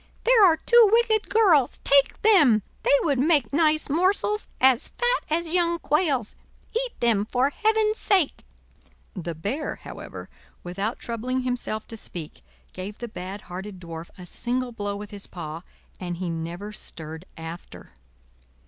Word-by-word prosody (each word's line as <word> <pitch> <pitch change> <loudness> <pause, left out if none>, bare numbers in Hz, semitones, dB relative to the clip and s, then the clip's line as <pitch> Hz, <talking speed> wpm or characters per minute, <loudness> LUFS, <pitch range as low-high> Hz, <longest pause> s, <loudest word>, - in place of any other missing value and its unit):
There 475 -3 +6
are 335 -4 +6
two 475 +1 +6
wicked 450 -2 +3
girls, 355 - +4
take 275 -1 +3
them; 295 - +5 0.2
they - - +4
would 280 -6 +1
make 285 -5 +2
nice 310 0 +3
morsels, 380 +7 +1
as 260 -2 +4
fat - - 0
as 325 +1 -1
young 340 -1 +2
quails; 295 - 0 0.4
eat 485 +1 -3
them 230 -4 +3
for 250 +5 +1
heaven's 435 +3 +1
sake." 375 -8 +1 0.7
The 170 -4 -5
Bear, 210 - -3
however, - - -9 0.4
without 195 +6 -3
troubling 245 +3 -3
himself 245 -4 -3
to 225 - -7
speak, 160 - -7 0.3
gave 200 +3 -7
the 240 - -6
bad 195 -2 -7
hearted 190 +2 -8
Dwarf 165 -1 -8
a 180 - -10
single 245 +6 -2
blow 205 -3 -4
with 205 0 -8
his 200 -1 -6
paw, 160 -2 -7 0.4
and 175 -2 -4
he 180 -1 -3
never 170 +5 -5
stirred 160 -3 -9
after. 165 - -9
245 Hz, 150 wpm, -25 LUFS, -, 0.7 s, There